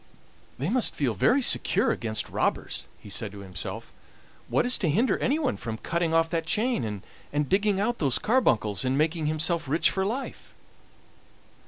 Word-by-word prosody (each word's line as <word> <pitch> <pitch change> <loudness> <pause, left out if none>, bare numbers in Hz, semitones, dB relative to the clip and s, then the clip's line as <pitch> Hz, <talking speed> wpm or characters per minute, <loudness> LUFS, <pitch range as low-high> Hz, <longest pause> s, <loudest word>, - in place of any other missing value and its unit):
"They 140 +7 -2
must 250 -2 +2
feel 130 -6 0
very 245 - +3
secure - - +2
against 110 -2 -3
robbers," - - -2
he - - -15
said 105 +1 -3
to 100 - -9
himself. 90 -3 -7 0.6
"What - - +1
is 250 - +4
to 175 - +1
hinder 225 - +2
anyone 280 -1 0
from 115 -1 -4
cutting 170 +6 -1
off 165 0 +3
that 165 -1 -1
chain 165 - 0 0.3
and 145 0 0
digging 200 0 +2
out 235 +4 0
those 140 -5 +2
carbuncles, 130 - +1
and 130 +1 0
making 155 +1 +1
himself 160 +1 0
rich 160 +4 +3
for 190 - -1
life?" 235 +8 -5
165 Hz, 165 wpm, -27 LUFS, -, 0.6 s, is